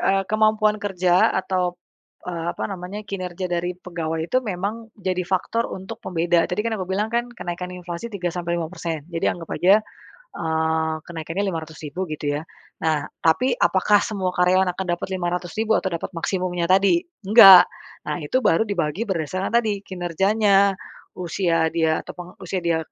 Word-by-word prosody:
eee, 195 0 +2
kemampuan 215 0 +3
kerja 180 -2 +3
atau, 180 -2 -1 0.5
eee, 170 -2 -4
apa - - -5
namanya 190 +2 -6
kinerja 185 -2 -4
dari 175 +1 -1
pegawai 165 -3 -4
itu 255 - +2
memang 210 +4 -4
jadi 185 -1 -1
faktor 205 +5 -1
untuk 225 +5 -8
pembeda. 170 -1 +1
Tadi 180 - 0
kan 230 -1 0
aku 185 - -3
bilang 205 +3 0
kan 240 +1 0
kenaikan 180 -4 -5
inflasi 180 +5 -6
3 180 -3 -2
sampai 170 -1 -2
5%. 165 -2 -4
Jadi 165 - -2
anggap 165 -2 -7
aja, 195 +4 +5 0.6
eee, 160 -1 0
kenaikannya 165 +4 -4
500.000 160 -1 -5
gitu 145 -1 -2
ya. - - -8 0.4
Nah, 155 -2 +1 0.2
tapi 245 +11 +3
apakah 205 +2 +3
semua 195 -5 -2
karyawan 180 +1 +3
akan 190 0 -4
dapat - - -5
500.000 180 +5 -1
atau 190 - -2
dapat 170 - -3
maksimumnya 180 0 -1
tadi? 190 -2 +5 0.3
Enggak. 195 -4 +10 0.4
Nah, - - -2
itu 255 +13 0
baru 165 +6 +3
dibagi 175 -1 -1
berdasarkan 185 +2 -2
tadi 215 -4 +1
kinerjanya, 195 +3 +2 0.4
usia 170 -2 +1
dia 160 -1 +2
atau - - -9
penge 180 0 -9
usia 185 +1 -3
dia 170 -1 +1
180 Hz, 155 wpm, -23 LUFS, 170-200 Hz, 0.6 s, Enggak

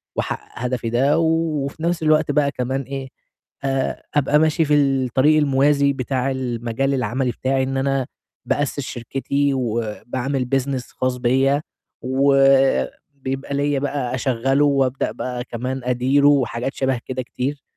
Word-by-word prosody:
وأحقّق 120 - -4
هدفي 125 -2 -2
ده 135 +7 +2
و - - +2 0.4
وفي 155 +3 -7
نَفْس 170 -1 0
الوقت 155 -1 +3
بقى 140 -1 +2
كمان 130 +1 -2
إيه، 135 -1 -6 0.5
آآ 135 -1 -1
أبقى 145 +1 +3
ماشي 160 +1 +2
في 150 0 +3
الطريق 135 +1 +3
الموازي 140 0 +3
بتاع 130 0 -1
المجال 125 +1 -2
العملي 125 0 0
بتاعي، 130 +1 0
إن 135 0 -2
أنا 135 -1 0 0.4
بأسِّس 145 0 -1
شركتي 135 +2 -1
وباعمل 120 +2 -2
business 135 -1 -1
خاص 130 -1 -2
بيّا، 135 +4 +2 0.4
وبيبقى 135 - +1
ليّا 145 -1 +1
بقى 140 -3 -2
أشغّله 135 +3 +1
وأبدأ 135 -2 +1
بقى 125 -1 -4
كمان 130 +2 -4
أديره 130 +3 +3
وحاجات 130 -2 +1
شَبه 130 -2 0
كده 130 0 -3
كتير، 135 +4 -4
135 Hz, 135 wpm, -21 LUFS, 125-140 Hz, 0.5 s, الوقت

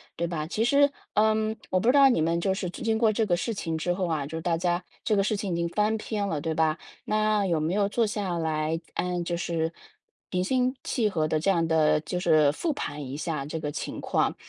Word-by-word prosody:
对 170 - -1
吧？ 160 -2 -3
其 215 +5 -1
实， 285 +3 +5 0.2
嗯， 220 +1 +2
我 185 - +2
不 210 - -1
知 250 - +6
道 275 -1 +7
你 240 - +2
们 170 +1 +1
就 190 +2 +1
是 190 -2 -3
这 - - -9
经 225 -1 +1
过 220 -2 +3
这 225 +1 +1
个 175 -4 +1
事 230 - -2
情 165 -5 -3
之 175 +3 0
后 180 0 -1
啊， 155 -4 -1
就 160 +3 -5
大 165 0 0
家 175 +1 0 0.2
这 215 - +2
个 195 - +3
事 210 0 0
情 200 -3 -3
已 - - 0
经 170 0 -1
翻 210 +4 +1
篇 210 -1 -3
了， 155 -6 -2
对 160 +1 -1
吧？ 160 0 +2 0.3
那 215 -1 +2
有 170 -4 +1
没 160 +4 -1
有 205 -1 +2
坐 225 +2 +1
下 200 -5 -2
来， 160 0 -1 0.2
呃， 180 0 -1
就 170 0 -2
是 165 -1 -1 0.6
平 180 0 0
心 255 +5 +1
气 230 -4 0
和 160 -5 0
地 155 0 0
这 180 +6 0
样 170 -3 +2
地 155 -1 +3
就 180 +3 -3
是 155 -4 +4
复 305 - -2
盘 150 - -5
一 130 +1 -6
下 155 -2 -3
这 160 +2 -4
个 150 - -3
情 - - -5
况？ - - 0
175 Hz, 270 characters per minute, -27 LUFS, 160-215 Hz, 0.6 s, 道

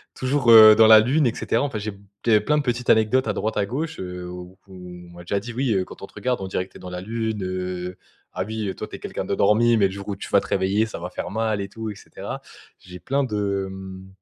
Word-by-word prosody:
toujours, 130 -2 +2
heu, 110 -1 +10
dans 110 +1 +6
la 110 -1 +9
lune, 135 +7 +2
et 115 - 0
cetera. 115 - 0
Enfin, 135 -7 -3
j'ai 105 +1 -4
b 100 - -15 0.3
j'avais 110 -3 +5
plein 150 +8 +1
de 145 - 0
petites 120 -1 -2
anecdotes 110 +3 +3
à 105 - 0
droite, 110 +2 -2
à 105 - +1
gauche, 155 +10 -4
heu, 90 -1 -6
où 90 +1 -10
on - - -13 0.4
m'a 85 0 -12
déjà 100 +3 -1
dit: 120 +3 -8
«Oui, 125 -3 0
quand - - -12
on - - -3
te - - -24
regarde, 125 -1 -2
on 95 - -4
dirait 95 0 -3
que - - -32
tu - - -12
es - - -15
dans 90 - -9
la 90 0 -5
lune. 110 +1 -3
Heu, 90 0 -4 0.4
ah 90 - -2
oui, 110 -2 -3
toi, - - -6
tu - - -9
es - - -10
quelqu'un - - -5
d'endormi 115 +4 +3
mais 100 -2 +4
le - - -7
jour 100 +1 -8
où 100 - -2
tu 95 - -8
vas 100 - +5
te - - -10
réveiller, 100 +3 +1
ça 110 - -7
va 90 - -6
faire 90 - -6
mal 110 -1 -1
et 100 - -4
tout» 110 +2 -6
et - - -9
cetera. - - -8 0.4
J'ai 90 0 -12
plein 135 +11 0
de, 100 -5 -2
mmh, 95 0 -9
105 Hz, 280 wpm, -23 LUFS, 95-115 Hz, 0.4 s, heu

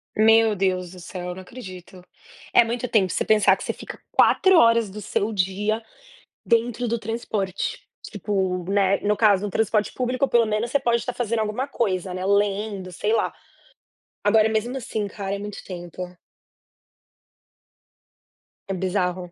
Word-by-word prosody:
Meu 225 0 +5
Deus 185 -2 0
do 180 - -12
céu, 180 0 -6
eu 180 - -5
não 190 - -8
acredito. 185 -4 -11 0.5
É - - +7
muito 240 +2 -2
tempo 200 -5 +2
você - - 0
pensar 215 -1 +4
que - - -9
você - - -1
fica - - -9
4 380 -1 +5
horas 230 -6 +5
do 210 +3 -8
seu 205 +2 -1
dia 205 +3 0 0.6
dentro 235 +1 +1
do 235 0 -1
transporte. 210 -4 -3 0.2
Tipo, 190 -3 -2
né, 195 -1 +3
no 210 0 0
caso, 205 -2 +4
no 205 - -3
transporte 215 +1 0
público 255 +2 0
pelo 235 -2 +4
menos 215 +2 -1
você 285 - +3
pode 235 -2 +2
estar 240 +2 -4
fazendo 230 -2 -1
alguma 220 +6 -1
coisa, 190 -8 -1
né, 185 +1 -4
lendo, 200 -1 0
sei 210 +5 -1
lá. 230 - +1 0.9
Agora, 215 +1 +5
mesmo 225 +4 -1
assim 225 -5 -3
cara, 200 0 -4
é - - -4
muito 205 0 -7
tempo. 175 -1 -7 2.7
É 195 - -2
bizarro. 180 -1 -2
210 Hz, 160 wpm, -23 LUFS, 190-230 Hz, 2.7 s, É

